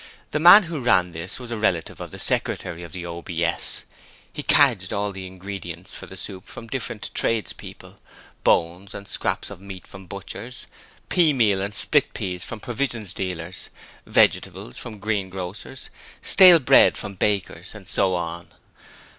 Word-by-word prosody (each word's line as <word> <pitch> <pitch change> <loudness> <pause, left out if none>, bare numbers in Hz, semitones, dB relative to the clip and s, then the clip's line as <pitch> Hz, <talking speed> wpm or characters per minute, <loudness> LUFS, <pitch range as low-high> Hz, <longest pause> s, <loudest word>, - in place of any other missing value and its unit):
The 150 - 0
man 175 +6 +9
who 165 -4 -5
ran 90 -7 +3
this 85 +7 -4
was 125 -2 -9
a 115 - -2
relative 95 -7 -1
of - - -6
the - - -9
secretary 85 0 -1
of 85 -2 -9
the 85 +1 -6
OBS. 85 0 -2 0.5
He - - -5
cadged - - +4
all 100 0 -1
the 95 -1 -8
ingredients 90 -2 -8
for - - -9
the - - -11
soup 95 -2 -6
from 115 - -10
different 115 -2 -5
tradespeople: 115 -2 -3 0.4
bones 90 +4 +1
and 100 - -9
scraps - - -2
of - - -10
meat 95 -2 -10
from 95 -1 -13
butchers: 100 +6 -7 0.4
pea 165 -4 +4
meal 105 -7 +2
and 100 +1 -4
split - - +2
peas 90 -1 -4
from 115 - -7
provision 120 0 -2
dealers: 90 -2 -5 0.4
vegetables 60 - +1
from 115 -3 -8
greengrocers: 95 -2 -4 0.3
stale 180 -3 +9
bread 135 -7 +5
from 100 - -5
bakers, 100 0 -2
and - - -12
so 95 -1 +1
on. 85 0 -5
95 Hz, 155 wpm, -23 LUFS, 90-115 Hz, 0.5 s, man